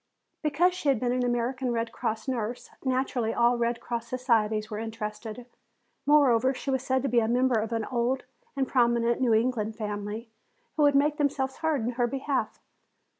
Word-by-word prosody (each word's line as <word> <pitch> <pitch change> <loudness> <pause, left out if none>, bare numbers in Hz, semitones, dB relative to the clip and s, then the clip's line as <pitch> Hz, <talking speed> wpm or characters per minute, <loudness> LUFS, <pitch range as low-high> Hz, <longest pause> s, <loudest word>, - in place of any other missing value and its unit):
Because 320 +4 +2
she 330 -5 -1
had 265 -5 +3
been 245 0 0
an 250 0 0
American 245 +1 -1
Red 230 0 -1
Cross 220 +2 -3
nurse, 240 -2 -3
naturally 255 -3 0
all 240 0 +3
Red 235 0 0
Cross 235 0 -4
societies 225 -4 0
were 210 - -3
interested. 220 +1 -6 0.6
Moreover, 265 -3 +4
she 270 +2 -3
was 265 -1 0
said 260 0 0
to - - +1
be 245 -2 +3
a 220 - +1
member 245 0 +2
of 220 +1 -3
an 225 -2 -1
old 250 +1 0 0.3
and 270 -1 0
prominent 235 -1 +2
New 235 -4 +4
England 225 -2 0
family, 210 +1 -5 0.4
who 310 - 0
would 290 -1 +5
make 295 +2 +3
themselves 270 -3 0
heard 320 -5 0
in 235 - 0
her 245 0 0
behalf. 270 +2 -2
240 Hz, 180 wpm, -27 LUFS, 225-265 Hz, 0.6 s, would